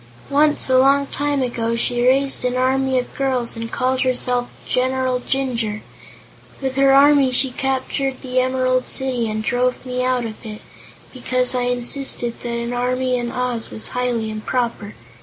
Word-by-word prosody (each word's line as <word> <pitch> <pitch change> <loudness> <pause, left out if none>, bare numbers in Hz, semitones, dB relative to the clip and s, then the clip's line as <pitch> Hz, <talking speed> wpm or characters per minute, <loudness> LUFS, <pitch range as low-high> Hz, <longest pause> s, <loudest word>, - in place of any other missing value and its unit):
Once, 295 +1 +3
a 260 -1 +4
long 275 +1 +4
time 285 -1 -1
ago, 235 -2 -2
she 240 +1 0
raised 270 +1 +2
an 250 0 0
army 265 +1 +1
of 250 - -3
girls 260 -4 -1
and 230 0 -6
called 255 +1 0
herself 250 -1 0 0.2
'General 255 0 0
Jinjur.' 240 -5 -2 0.8
With 265 -1 -3
her 275 0 +4
army 280 -1 +5
she 255 +1 +2
captured 265 +1 -2
the 255 -1 0
Emerald 255 0 +1
City, 255 -4 0
and 215 0 -3
drove 250 +3 0
me 250 0 -2
out 255 -1 0
of 220 +1 -8
it, 215 -2 -8 0.5
because 255 0 +1
I 250 -1 0
insisted 245 0 0
that 240 - -5
an 235 +1 -3
army 255 +1 0
in 240 -1 -3
Oz 250 -2 -1
was 220 - -6
highly 240 -3 -2
improper. 215 -1 -3
255 Hz, 160 wpm, -20 LUFS, 240-265 Hz, 0.8 s, army